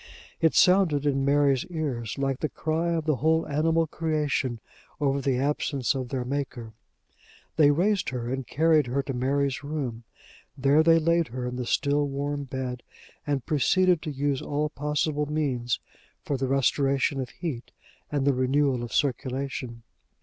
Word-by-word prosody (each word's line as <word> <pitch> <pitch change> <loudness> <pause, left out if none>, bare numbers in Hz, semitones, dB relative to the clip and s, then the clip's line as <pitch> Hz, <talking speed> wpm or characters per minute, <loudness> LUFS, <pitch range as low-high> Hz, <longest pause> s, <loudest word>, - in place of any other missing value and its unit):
It 160 -2 +3
sounded 180 -6 +4
in 135 -2 +1
Mary's 140 -2 +3
ears 145 - -3
like 135 -1 -1
the 155 - -1
cry 165 +2 -1
of 160 -2 -2
the 155 -4 +1
whole 160 +5 +2
animal 160 +3 +2
creation 150 -6 -1 0.4
over 140 -1 +1
the 135 -2 +1
absence 140 -1 0
of 130 -3 -4
their 130 -2 -2
Maker. 125 -4 -4 0.8
They 150 -3 +6
raised 185 +7 +2
her 125 -2 -4
and 130 0 -3
carried 155 -1 +3
her 135 +3 -1
to 135 - -4
Mary's 135 +2 0
room. 135 -6 -4 0.5
There 140 +3 +4
they 165 +1 +5
laid 170 0 +2
her 125 +1 -5
in 125 0 -4
the 125 -1 -4
still 145 0 +1
warm 140 +1 -3
bed, 130 -2 -4 0.5
and 140 -4 -1
proceeded 175 +4 +3
to 155 - -4
use 140 -1 -1
all 150 +1 -1
possible 150 0 -1
means 130 -6 -1 0.4
for 145 - -2
the 135 0 -1
restoration 135 +1 +1
of 125 - -5
heat 145 -9 -6 0.4
and 145 -2 0
the 140 - +4
renewal 130 0 +1
of 120 -1 -6
circulation. 130 -3 -2
140 Hz, 160 wpm, -26 LUFS, 130-150 Hz, 0.8 s, They